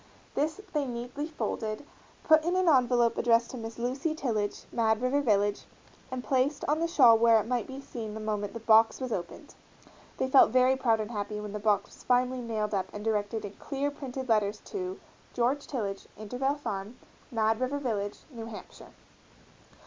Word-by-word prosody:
This 310 +6 -1
they 295 -2 +1
neatly 245 +5 -4
folded, 225 -6 -4 0.4
put 315 0 +5
in 350 +2 0
an 370 -1 +2
envelope 245 -5 +4
addressed 235 0 +3
to 255 - -6
Miss 225 -1 -7
Lucy 265 +6 -1
Tillage, 215 -9 -2
Mad 220 -2 +2
River 255 +4 +1
Village, 205 -5 +1 0.4
and 255 -1 -4
placed 270 +3 +1
on 300 +2 +1
the 335 - +1
shawl 255 -9 +7
where 230 -1 +6
it 210 - -3
might 245 0 -1
be 265 0 -7
seen 225 -6 -7
the - - -5
moment 210 -2 -3
the - - -4
box 225 0 +5
was 255 -2 -4
opened. 190 - -5 0.6
They 260 - 0
felt 265 +1 +7
very 255 +2 +4
proud 235 -4 +2
and 215 +2 -5
happy 210 -1 -3
when 210 -1 -6
the 210 - -3
box 205 -1 +1
was - - -16
finally 250 0 +2
nailed 220 -3 -2
up 190 -2 0
and 210 +1 -7
directed 215 0 -1
in 200 - -7
clear 285 0 -2
printed 265 -2 -6
letters 210 -2 +2
to 375 -1 -4 0.4
GEORGE 255 +4 0
TILLAGE, 200 -7 -4
Intervale 250 +7 -1
Farm, 210 -5 -5 0.3
Mad 220 -1 +1
River 255 +3 -1
Village, 210 -7 -3
New 230 -3 -7
Hampshire. 220 -2 -11
235 Hz, 185 wpm, -29 LUFS, 215-270 Hz, 0.6 s, shawl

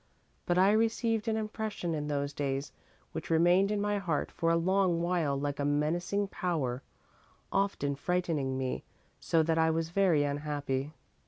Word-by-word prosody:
"But 175 - +2
I 190 +2 +6
received 225 0 +1
an 220 -1 +1
impression 215 -5 -3
in 150 -1 -2
those 145 -1 -2
days 140 -1 -2 0.4
which - - -6
remained 175 +4 +4
in 210 -1 0
my 205 0 0
heart 170 -6 -1
for 165 - 0
a 165 - +4
long 180 0 +2
while 165 -6 0
like 145 0 -3
a - - 0
menacing 170 +7 0
power, 140 -11 -2 0.7
often 195 -8 0
frightening 150 -4 -1
me 130 -1 -2 0.4
so 165 -1 +2
that 165 0 +1
I 160 0 +4
was 160 0 0
very 175 -6 +3
unhappy. 145 -1 -2
165 Hz, 160 wpm, -31 LUFS, 145-195 Hz, 0.7 s, I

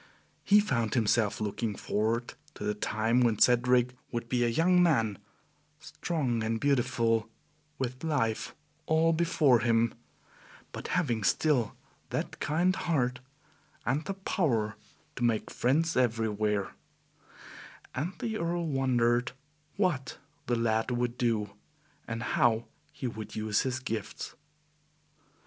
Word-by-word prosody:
He 205 +1 +6
found 120 - 0
himself 110 -2 +2
looking 105 0 -2
forward 115 +5 -1 0.2
to - - -7
the 105 0 0
time 110 +3 +1
when 115 -3 +3
Cedric 125 +1 +4 0.2
would 120 -1 -4
be 125 -1 +2
a - - +3
young 180 +9 +3
man, 115 - +2 0.6
strong 135 -9 -2
and 115 +1 -1
beautiful, 115 -4 +1 0.5
with 130 +1 -4
life 130 -9 -1 0.3
all 160 +1 +3
before 160 -6 +3
him, 115 0 +2 0.8
but - - -6
having 120 - 0
still 130 -3 +2 0.3
that - - -3
kind 175 +5 +1
heart 130 -6 0 0.7
and 135 +6 0
the 195 - -3
power 120 - 0 0.4
to 125 - -2
make 115 -2 +1
friends 160 +7 +1
everywhere, 110 -4 +1 1.2
and 155 +8 -2
the 220 +1 -3
Earl 170 0 -1
wondered 125 -4 +1 0.4
what 175 -10 0 0.3
the 120 - +2
lad 115 0 +1
would 120 -1 -1
do, 110 -5 0 0.6
and 115 0 -4
how 115 -2 +2 0.3
he - - -7
would 110 -3 -5
use 110 -1 +1
his 130 -1 -1
gifts. 115 -5 -5
120 Hz, 125 wpm, -30 LUFS, 115-145 Hz, 1.2 s, He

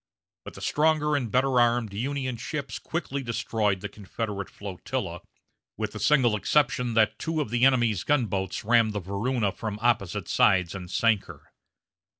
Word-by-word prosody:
But - - -9
the - - -10
stronger 150 -1 +2
and 125 -5 -1
better 130 0 +3
armed 120 -3 +2
Union 130 +3 -2
ships 140 +4 -5
quickly 140 -4 -3
destroyed 110 -5 -1
the 105 - -3
Confederate 100 0 -5
flotilla, 95 -1 -5 0.6
with - - -2
the - - -7
single 130 -7 +3
exception 125 0 +1
that 110 0 +3
two 160 +2 -2
of 130 -8 -2
the 120 +1 +3
enemy's 120 -8 +2
gunboats 110 -7 -1
rammed 115 -1 +4
the 105 - -2
Varuna 100 +4 -1
from 105 +1 -5
opposite 110 -5 0
sides 90 -3 +3
and 90 -2 -7
sank 110 +1 +2
her. - - -14
115 Hz, 155 wpm, -26 LUFS, 100-130 Hz, 0.6 s, rammed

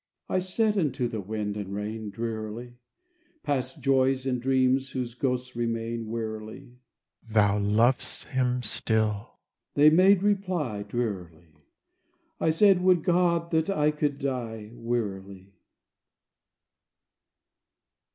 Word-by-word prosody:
I 185 - +1
said 205 +3 +1
unto 135 -6 0
the 110 -3 -4
wind 105 +1 -4
and 100 -1 -5
rain, 105 +1 -4
Drearily: 115 +2 -5 0.7
"Past 130 0 -2
joys, 135 -1 +2
and 125 -2 -1
dreams 130 +1 +2
whose 125 -2 -3
ghosts 125 0 -2
remain, 115 -1 -3
Wearily." 110 +3 -6 0.5
"Thou 105 -2 +3
lov'st 110 +5 +1
him 125 -1 0
still," 110 -1 0 0.4
they 150 +1 +7
made 185 +3 +5
reply, 185 - 0
Drearily. 95 -7 -4 0.9
I - - +2
said, 185 +3 +5
"Would 180 -3 +4
God 170 -1 +2
that 160 +3 +1
I 150 -6 +2
could 150 -2 -1
die!" 115 -6 -4
Wearily. 100 -5 -4
125 Hz, 110 wpm, -27 LUFS, 110-145 Hz, 0.9 s, they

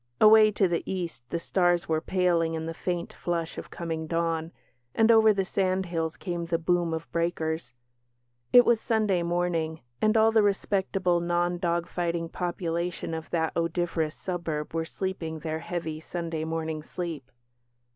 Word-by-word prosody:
Away 215 0 +8
to 195 -2 +3
the 170 -1 0
East 175 -8 -4
the - - -1
stars 175 0 +1
were 160 -1 +1
paling 170 -3 +1
in 160 0 -3
the 165 - -4
faint 175 +1 -3
flush 170 -2 -3
of - - -9
coming 160 -2 -4
dawn, 165 0 -1 0.4
and 225 +1 +5
over 220 -1 +7
the 195 -2 0
sandhills 185 -4 -1
came 175 -3 -4
the 165 0 +1
boom 170 0 +1
of 160 0 -5
breakers. 160 -5 -2 0.8
It 245 -1 +8
was 230 -2 +3
Sunday 210 -5 +1
morning, 170 -2 -1 0.2
and 215 +1 +4
all 220 0 +5
the 220 -1 +5
respectable, 195 -3 +1
non 175 +1 0
dog 170 -1 0
fighting 170 -1 -2
population 170 -1 -3
of 160 0 -5
that 160 -2 -1
odoriferous 165 -1 -1
suburb 165 -5 -4
were 165 0 -1
sleeping 170 -3 -4
their 155 0 -3
heavy, 165 -2 -4
Sunday 165 -1 -4
morning 160 -1 -3
sleep. 155 -5 -6
170 Hz, 155 wpm, -27 LUFS, 160-180 Hz, 0.8 s, Away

